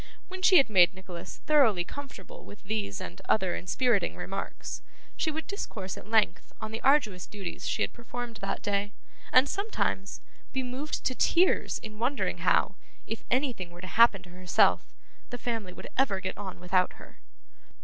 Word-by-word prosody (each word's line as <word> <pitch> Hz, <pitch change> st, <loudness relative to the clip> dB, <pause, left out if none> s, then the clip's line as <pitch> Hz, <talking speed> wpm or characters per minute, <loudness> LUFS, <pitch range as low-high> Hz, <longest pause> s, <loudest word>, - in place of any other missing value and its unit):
When 375 Hz, 0 st, -7 dB
she 370 Hz, 0 st, +7 dB
had 275 Hz, -, +6 dB
made 185 Hz, -3 st, +5 dB
Nicholas 185 Hz, -1 st, -9 dB
thoroughly 245 Hz, -12 st, +4 dB
comfortable 285 Hz, -, -9 dB
with 205 Hz, -, -13 dB
these 205 Hz, -, -2 dB
and 90 Hz, +1 st, -8 dB
other 190 Hz, -5 st, +2 dB
inspiriting 205 Hz, +1 st, +1 dB
remarks, 195 Hz, +1 st, -5 dB, 0.3 s
she 320 Hz, -, 0 dB
would 315 Hz, +1 st, -4 dB
discourse 205 Hz, -, -5 dB
at -, -, -11 dB
length 215 Hz, -5 st, +2 dB
on 220 Hz, -, -5 dB
the 225 Hz, -, -4 dB
arduous 240 Hz, -, +3 dB
duties 195 Hz, -4 st, -6 dB
she -, -, +1 dB
had -, -, -2 dB
performed 240 Hz, -1 st, -6 dB
that 195 Hz, -2 st, -4 dB
day; 205 Hz, 0 st, -1 dB, 0.4 s
and, 255 Hz, +2 st, +6 dB
sometimes, 390 Hz, -, -2 dB, 0.3 s
be 265 Hz, 0 st, -1 dB
moved 260 Hz, +4 st, -4 dB
to 255 Hz, -, +2 dB
tears 350 Hz, +7 st, +3 dB
in 215 Hz, -1 st, -8 dB
wondering 260 Hz, +4 st, 0 dB
how, -, -, +3 dB, 0.3 s
if 225 Hz, -, -5 dB
anything 245 Hz, -8 st, 0 dB
were 175 Hz, +1 st, -12 dB
to -, -, -7 dB
happen 215 Hz, 0 st, +5 dB
to 175 Hz, -, -13 dB
herself, 180 Hz, 0 st, +2 dB, 0.4 s
the 245 Hz, -, -5 dB
family 225 Hz, -5 st, -3 dB
would -, -, -10 dB
ever 210 Hz, -8 st, +2 dB
get 185 Hz, 0 st, -4 dB
on 195 Hz, -3 st, -7 dB
without 180 Hz, +1 st, +2 dB
her. -, -, -15 dB
215 Hz, 170 wpm, -29 LUFS, 185-260 Hz, 0.4 s, she